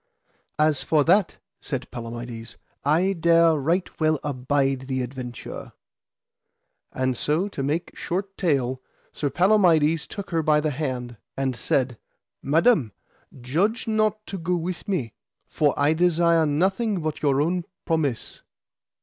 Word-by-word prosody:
As 155 -1 +3
for 155 -2 +2
that, 185 +4 +3 0.2
said - - -5
Palamides, 115 0 -7 0.3
I 170 +7 +2
dare 170 -1 +4
right 165 +6 0
well 155 -1 +2
abide 135 -1 -1
the 130 -1 -1
adventure. 125 -1 -7 1.2
And 130 -1 -1
so, 155 +10 0
to 145 - -5
make 150 +5 -2
short 195 +2 -4
tale, 130 -7 0 0.3
Sir 145 - -2
Palamides 165 -2 +3
took 200 -1 -7
her 165 -1 +1
by 150 -1 +3
the 150 0 0
hand 130 -5 -4 0.2
and 135 -2 -1
said: 125 -1 -1 0.4
Madam, 155 - +3 0.5
grudge 195 - 0
not 215 -1 0
to 195 - -6
go 175 +2 0
with 175 +1 -4
me, 150 - -2 0.3
for 150 -2 +2
I 145 +2 +4
desire 170 -1 +3
nothing 190 +6 +1
but 155 -1 -3
your 140 -2 +2
own 170 +3 0 0.2
promise. 150 -8 -1
155 Hz, 130 wpm, -24 LUFS, 135-175 Hz, 1.2 s, dare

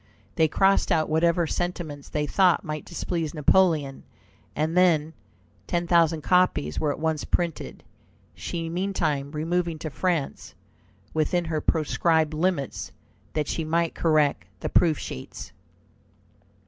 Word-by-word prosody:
They 160 - +3
crossed 195 +5 +2
out 155 -1 +2
whatever 170 +2 +2
sentiments 160 -4 -4
they 150 0 -1
thought 180 +4 +3
might 155 -1 -5
displease 170 -2 -3
Napoleon, 150 -3 +2 0.5
and 155 +3 -1
then 160 -4 +3 0.5
ten 175 0 -1
thousand 165 -2 +3
copies 180 - +2
were 150 - +1
at - - -4
once 160 -1 -1
printed, 170 -3 -2 0.5
she 165 -1 -5
meantime 165 -6 -1
removing 165 +2 -1
to 155 0 -6
France, 165 -1 -2 0.6
within 165 +3 0
her 160 -2 -2
proscribed 160 0 +1
limits, 160 -3 -2 0.4
that 150 -2 -1
she 165 - -2
might 165 +1 0
correct 150 - +1
the - - -2
proof 160 -4 +3
sheets. 65 - -8
160 Hz, 125 wpm, -25 LUFS, 150-175 Hz, 0.6 s, They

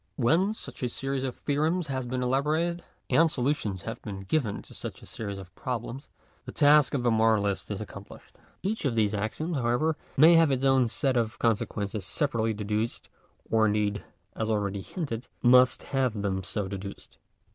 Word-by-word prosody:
When 170 - +2
such 130 - -10
a 125 - 0
series 135 +2 -3
of 130 -2 -3
theorems 155 +5 0
has 130 -3 -3
been 125 +1 -2
elaborated, 155 +7 0 0.3
and 165 0 +5
solutions 120 - -1
have 115 +1 -6
been 100 -3 -6
given 105 +1 -1
to - - -15
such - - -7
a - - -10
series 100 -3 -5
of 95 -1 -11
problems, 125 +2 -5 0.4
the - - -6
task 145 -1 +5
of 125 - -1
the 120 - +3
moralist 110 -3 +2
is - - -4
accomplished. - - -11 0.3
Each 210 +4 -1
of 135 -6 0
these 110 -2 +2
axioms, 125 - -2
however, 125 +6 +1 0.2
may 160 +5 +8
have 165 -2 +6
its' 135 0 0
own 135 -2 +4
set 130 +3 0
of 115 -1 -1
consequences 105 -2 -1
separately 115 - 0
deduced, 105 +2 -2 0.4
or 110 -1 +3
indeed, 105 -1 0 0.3
as 110 0 -2
already 100 -2 -1
hinted, 125 - -5 0.2
must 125 +1 +5
have 130 -6 0
them 95 -1 -1
so 100 +2 -2
deduced. 100 0 -8
120 Hz, 175 wpm, -28 LUFS, 105-140 Hz, 0.4 s, may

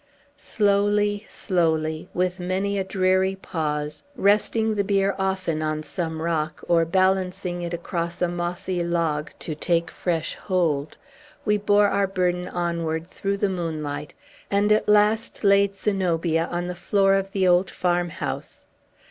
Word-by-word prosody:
Slowly, 205 0 +1
slowly, 160 -3 0
with 180 +1 -1
many 190 +3 -1
a - - 0
dreary 190 0 +1
pause, 150 -5 -3
resting 220 +1 +2
the 205 -1 +1
bier 195 -1 +2
often 190 -4 -1
on 155 0 -2
some 160 -1 -3
rock 160 -1 -2
or 165 -1 +4
balancing 185 0 0
it 170 -1 -4
across 170 0 -3
a 180 - +2
mossy 175 +1 -2
log, 165 -3 -1
to 160 - -4
take 170 +2 0
fresh 165 -3 -2
hold, 160 -6 -1 0.5
we 210 -1 +3
bore 205 0 +4
our 195 0 +1
burden 180 -1 0
onward 170 -2 -2
through 195 +2 -3
the 205 - +1
moonlight, 155 -5 -4 0.3
and 200 +1 +2
at 215 0 +3
last 210 +2 +3
laid 200 0 +4
Zenobia 170 -5 0
on 175 0 -3
the 180 - -3
floor 195 +2 +2
of 195 0 0
the 190 -2 +1
old 180 +1 +4
farmhouse. 175 -2 -2
180 Hz, 140 wpm, -24 LUFS, 165-195 Hz, 0.5 s, or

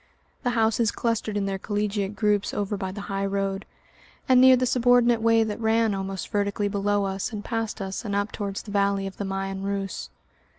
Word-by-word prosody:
The 245 - 0
houses 225 0 +2
clustered 225 -3 -1
in 200 - 0
their 195 -1 -2
collegiate 205 0 -2
groups 210 -2 +1
over 205 0 -1
by 190 -2 -4
the 205 +2 -7
high 195 -1 -2
road, 195 0 -2 0.6
and 255 -1 +6
near 260 0 +8
the 255 0 +1
subordinate 245 -1 +4
way 225 0 +4
that 220 +1 -4
ran 225 -1 +2
almost 195 -1 -4
vertically 205 0 0
below 205 0 0
us 195 +3 -3
and 210 -2 -6
past 225 -2 -3
us 195 +3 -4
and 205 -3 -3
up 205 +1 0
towards 200 -2 -4
the 205 - -9
valley 200 -1 +1
of 195 - -7
the 200 - -3
Meien 195 0 -3
Reuss. 195 -1 -3
205 Hz, 200 wpm, -25 LUFS, 195-225 Hz, 0.6 s, near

